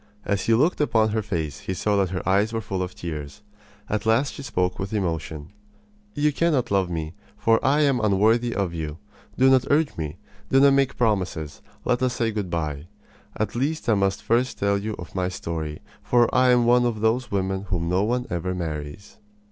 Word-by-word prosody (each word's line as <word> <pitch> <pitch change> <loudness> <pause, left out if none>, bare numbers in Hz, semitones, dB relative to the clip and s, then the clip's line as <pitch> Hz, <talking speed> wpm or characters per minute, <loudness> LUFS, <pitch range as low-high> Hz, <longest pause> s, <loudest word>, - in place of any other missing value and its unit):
As 100 -2 -1
he 115 - +5
looked 150 +7 +2
upon 110 -6 +3
her 110 +1 0
face 80 -9 -3
he 95 - -4
saw 105 +3 0
that 95 -2 +2
her 90 -1 -4
eyes 100 +3 +3
were 115 - -1
full 95 -3 -3
of 90 0 -4
tears. 75 +3 -7 0.4
At 110 +1 -2
last 125 +5 +2
she - - -8
spoke 90 -9 -1
with 95 +2 -4
emotion: 80 -6 -3 0.7
"You 150 0 +2
cannot 150 -8 +1
love 95 -3 +2
me, 80 -2 -4 0.2
for 115 0 +2
I 145 +3 +3
am 140 -4 +3
unworthy 110 +3 +2
of 95 -4 -1
you. 80 -2 -4 0.4
Do 130 - +5
not 130 -1 +4
urge 150 +1 +2
me. 80 0 -4 0.3
Do 135 - +4
not 140 0 +6
make 140 -1 +1
promises. 90 -9 -1 0.2
Let 125 0 +1
us 125 -1 +1
say 115 -1 0
good 105 -4 -3
by. 75 -2 -3 0.5
At 105 -1 -1
least 145 +6 -2
I - - +5
must 100 -1 0
first 120 +3 +1
tell 100 0 +1
you 105 +1 -4
of 85 - -9
my 90 -1 -1
story, 80 -4 -5 0.2
for 120 -1 +2
I 130 0 +4
am 125 -1 +4
one 120 +1 +4
of 110 -3 -3
those 115 +2 +1
women 95 0 -1
whom 90 -3 -2
no 90 +2 +2
one 125 +4 0
ever 90 +2 -2
marries." 80 +1 -6
105 Hz, 205 wpm, -24 LUFS, 90-120 Hz, 0.7 s, not